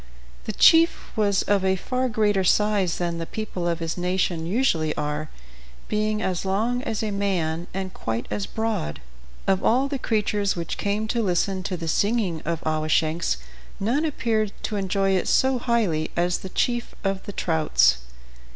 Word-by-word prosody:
The -, -, -2 dB
chief 330 Hz, +9 st, +4 dB
was 200 Hz, -3 st, +2 dB
of 200 Hz, -2 st, +1 dB
a 190 Hz, 0 st, +3 dB
far 255 Hz, +6 st, -1 dB
greater 210 Hz, -4 st, +2 dB
size 200 Hz, -2 st, +2 dB
than 170 Hz, -1 st, -2 dB
the 165 Hz, -, -4 dB
people 200 Hz, -5 st, -4 dB
of 170 Hz, -1 st, 0 dB
his 165 Hz, +1 st, -3 dB
nation 180 Hz, -2 st, 0 dB
usually 170 Hz, -, +1 dB
are, 150 Hz, +1 st, -3 dB, 0.6 s
being 215 Hz, 0 st, 0 dB
as 185 Hz, -2 st, -1 dB
long 220 Hz, +6 st, 0 dB
as 220 Hz, -4 st, -3 dB
a 215 Hz, -, -1 dB
man 175 Hz, -4 st, -1 dB
and 190 Hz, 0 st, -4 dB
quite 115 Hz, +1 st, -3 dB
as 200 Hz, -, -2 dB
broad. 220 Hz, -, -2 dB, 0.5 s
Of 190 Hz, -1 st, +1 dB
all 260 Hz, +4 st, +3 dB
the 275 Hz, -1 st, -3 dB
creatures 210 Hz, -3 st, 0 dB
which 170 Hz, -2 st, -4 dB
came 205 Hz, +2 st, -1 dB
to 235 Hz, -, +1 dB
listen 190 Hz, -1 st, 0 dB
to 185 Hz, -1 st, -3 dB
the 165 Hz, -1 st, -5 dB
singing 200 Hz, -2 st, +1 dB
of 165 Hz, 0 st, -2 dB
Awashanks 155 Hz, -, +1 dB, 0.4 s
none 240 Hz, +10 st, +1 dB
appeared 225 Hz, -9 st, 0 dB
to 215 Hz, -, -2 dB
enjoy 195 Hz, 0 st, +1 dB
it 190 Hz, -1 st, +1 dB
so 260 Hz, -1 st, +3 dB
highly 210 Hz, -11 st, 0 dB
as 175 Hz, +1 st, +1 dB
the 190 Hz, -, -7 dB
chief 240 Hz, +4 st, -1 dB
of 195 Hz, -1 st, -1 dB
the -, -, -3 dB
trouts. 65 Hz, -, +3 dB
195 Hz, 170 wpm, -24 LUFS, 170-215 Hz, 0.6 s, chief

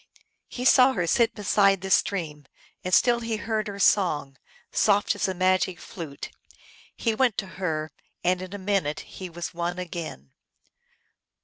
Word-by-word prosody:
He 250 Hz, -, -6 dB
saw 260 Hz, 0 st, +6 dB
her 180 Hz, -6 st, -1 dB
sit 230 Hz, +7 st, +2 dB
beside 195 Hz, -2 st, +3 dB
the 190 Hz, 0 st, -5 dB
stream, 155 Hz, -9 st, 0 dB, 0.4 s
and 185 Hz, -, -3 dB
still 240 Hz, +5 st, +4 dB
he 230 Hz, -1 st, -3 dB
heard 215 Hz, 0 st, -2 dB
her 200 Hz, -1 st, -6 dB
song, 155 Hz, -9 st, +2 dB, 0.4 s
soft 205 Hz, 0 st, +3 dB
as 205 Hz, -, -1 dB
a 190 Hz, -, -2 dB
magic 185 Hz, 0 st, +1 dB
flute. 155 Hz, -6 st, -8 dB, 0.6 s
He 230 Hz, -, 0 dB
went 240 Hz, -2 st, +1 dB
to -, -, -1 dB, 0.2 s
her, 155 Hz, -3 st, -2 dB, 0.3 s
and 180 Hz, +1 st, +1 dB
in 185 Hz, +2 st, -7 dB
a -, -, -4 dB
minute 190 Hz, -6 st, -1 dB
he 185 Hz, -1 st, -9 dB
was 175 Hz, 0 st, -6 dB
won 175 Hz, +1 st, -3 dB
again. 165 Hz, -, -6 dB
185 Hz, 155 wpm, -26 LUFS, 170-205 Hz, 0.6 s, saw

